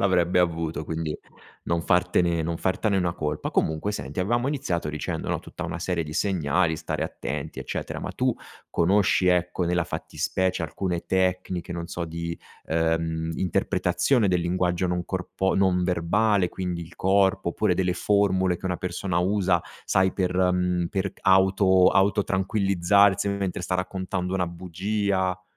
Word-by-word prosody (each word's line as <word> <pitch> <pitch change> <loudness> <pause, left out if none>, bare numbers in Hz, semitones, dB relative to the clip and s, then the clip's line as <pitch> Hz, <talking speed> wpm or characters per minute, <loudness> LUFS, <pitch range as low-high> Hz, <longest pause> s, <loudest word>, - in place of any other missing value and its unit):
l'avrebbe 90 -2 +2
avuto 85 -3 0
quindi 80 0 -3 0.5
non 85 -1 0
fartene 90 -1 +2
non 85 +1 -2
fartene 95 +4 0
una 90 -2 +1
colpa. 75 -2 -3
Comunque 80 +6 0
senti 70 -5 -6
avevamo 120 +6 +1
iniziato 110 - -2
dicendo 75 0 -4
no - - -1
tutta - - -8
una - - -4
serie 90 -2 -1
di 75 - -7
segnali, 85 -3 +1
stare - - -3
attenti, - - -5
eccetera. - - -4
Ma - - -4
tu - - 0 0.4
conosci 95 +1 +3
ecco, 90 0 +2
nella 85 0 +1
fattispecie 95 -2 -2
alcune 85 +2 -3
tecniche 90 -1 -1
non 85 -1 -4
so 85 0 -4
di, 85 +1 -4 0.3
ehm, 80 0 0
interpretazione 110 - +1
del 90 -1 +2
linguaggio 90 +1 0
non 90 0 -1
corpo 95 +1 -2
non 95 -2 +2
verbale 95 +3 +2
quindi 90 -1 -4
il 85 +1 -10
corpo, 95 0 +2
oppure 90 +2 +1
delle 90 0 +1
formule 95 -2 +2
che - - -20
una 90 -1 -1
persona 90 0 -2
usa, 95 -1 +2 0.2
sai 95 -1 +2
per 90 -2 -1
mhmm, 90 -1 +1
per 95 +1 -2
g - - -24
auto 95 0 +5
auto 100 +1 +3
tranquillizzarsi 100 0 +2
mentre 100 -2 -2
sta 90 +2 -2
raccontando 95 0 -2
una 90 -2 0
bugia? 95 +2 -2
90 Hz, 155 wpm, -25 LUFS, 85-95 Hz, 0.5 s, auto